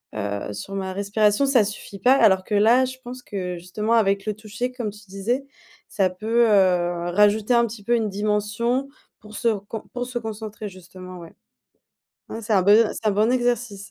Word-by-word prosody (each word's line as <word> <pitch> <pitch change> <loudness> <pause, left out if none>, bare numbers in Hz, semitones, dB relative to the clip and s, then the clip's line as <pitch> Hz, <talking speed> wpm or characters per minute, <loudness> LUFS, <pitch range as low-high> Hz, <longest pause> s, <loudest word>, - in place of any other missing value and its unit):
heu, 100 -1 -4
sur 105 - -7
ma 190 -1 -3
respiration, 210 +5 +1
ça 260 -5 +4
suffit 205 -1 -7
pas, 255 - +5
alors 190 -8 +4
que 210 - -2
là, 235 +5 +5
je 260 0 -7
pense 250 0 -8
que 180 -5 -5
justement 210 +6 -2
avec 200 -3 +2
le 215 - -1
toucher 215 +4 -5
comme 245 -4 -4
tu 210 0 -13
disais, 230 +8 -2 0.4
ça 190 -3 +1
peut, 225 +5 +1
heu, 175 -3 +2
rajouter 210 +4 +3
un 235 - +4
petit 210 -2 -10
peu 240 +3 +2
une 220 -2 0
dimension 210 +6 -1 0.3
pour 215 0 -13
se 235 - -1
recon 210 0 -2
pour 245 0 -3
se 245 -1 -4
concentrer 215 -1 -6
justement, 185 0 -12
ouais. 165 -1 -12 1.0
Mmh, 225 - -6
c'est 220 - -3
un 190 - +5
bon 205 +2 +6 0.2
c'est 220 - -6
un - - +3
bon 215 +4 +2
exercice. 240 -5 -1
210 Hz, 195 wpm, -23 LUFS, 195-235 Hz, 1.0 s, bon